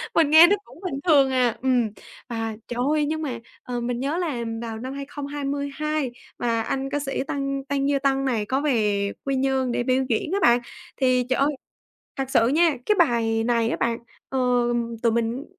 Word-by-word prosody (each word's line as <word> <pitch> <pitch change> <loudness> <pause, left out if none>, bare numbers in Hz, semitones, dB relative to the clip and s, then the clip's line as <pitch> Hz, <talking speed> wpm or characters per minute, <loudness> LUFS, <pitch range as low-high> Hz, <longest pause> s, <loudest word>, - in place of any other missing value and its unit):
mình 320 -3 +4
nghe 320 +2 +10
nó 400 - +4
cũng 275 - -16
bình 335 -7 -3
thường 280 -5 +5
à, 250 -3 +2
ừm. 250 -3 +2 0.4
Và 225 -2 -3
trời 240 - -5
ơi, 305 -1 +2
nhưng 315 +1 -2
mà, 255 -6 -3 0.2
ờ, 245 -1 -4
mình 240 0 -2
nhớ 280 +5 -1
là 330 -8 -2 0.2
vào 225 -1 -5
năm 260 +3 -5
2022 285 0 -3 0.3
mà 230 -1 0
anh 270 +4 -2
ca 290 +1 -1
sĩ 270 -2 -2
Tăng 275 -1 -2
Tăng 280 0 0
Duy 280 -1 +2
Tân 270 0 +2
này 230 -5 0
có 265 +5 0
về 210 -8 +1
Quy 275 -1 0
Nhơn 265 -1 +1
để 240 - 0
biểu 260 +1 +2
diễn 235 +7 0
á 400 - +1
bạn, 240 -4 +5 0.4
thì 255 -2 +2
trời 260 - +1
ơi, 280 +1 +3 0.7
thật 270 -1 -3
sự 230 -3 +4
nha, 315 +3 +3
cái 425 - +3
bài 230 -7 +2
này 230 -1 +1
á - - -1
bạn, 235 0 0 0.3
ờ, 265 - -1 0.6
tụi 230 - +4
mình 235 +4 -1
265 Hz, 200 wpm, -24 LUFS, 240-285 Hz, 0.7 s, nghe